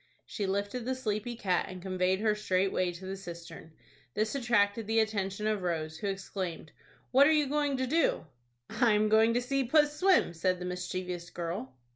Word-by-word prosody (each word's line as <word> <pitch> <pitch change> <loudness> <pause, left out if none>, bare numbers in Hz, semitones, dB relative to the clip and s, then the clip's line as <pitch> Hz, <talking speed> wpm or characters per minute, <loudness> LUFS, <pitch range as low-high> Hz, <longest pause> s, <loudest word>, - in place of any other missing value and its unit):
She 205 -3 -3
lifted 200 +5 -2
the 260 +1 -1
sleepy 235 -1 -3
cat, 190 -6 0
and 185 0 -7
conveyed 185 +1 0
her 215 -1 +3
straightway 185 -3 0
to 180 +2 -10
the 190 +1 -4
cistern. 170 -3 -10 0.4
This 215 0 0
attracted 225 -5 +1
the 225 +1 +2
attention 210 -2 -1
of 215 -2 0
Rose, 160 -3 -3
who 205 - -3
exclaimed, 190 -5 -4 0.4
"What 275 +2 +7
are - - +5
you 305 -2 +3
going 290 0 0
to 260 - 0
do?" 320 - +1 0.4
"I 225 0 +2
am 210 0 +2
going 220 +2 +4
to 245 - +2
see 275 +2 0
puss 295 +3 +3
swim," 370 - +3
said 185 +2 0
the 180 - -6
mischievous 180 -1 -4
girl. 165 -7 -5
205 Hz, 185 wpm, -30 LUFS, 180-240 Hz, 0.4 s, What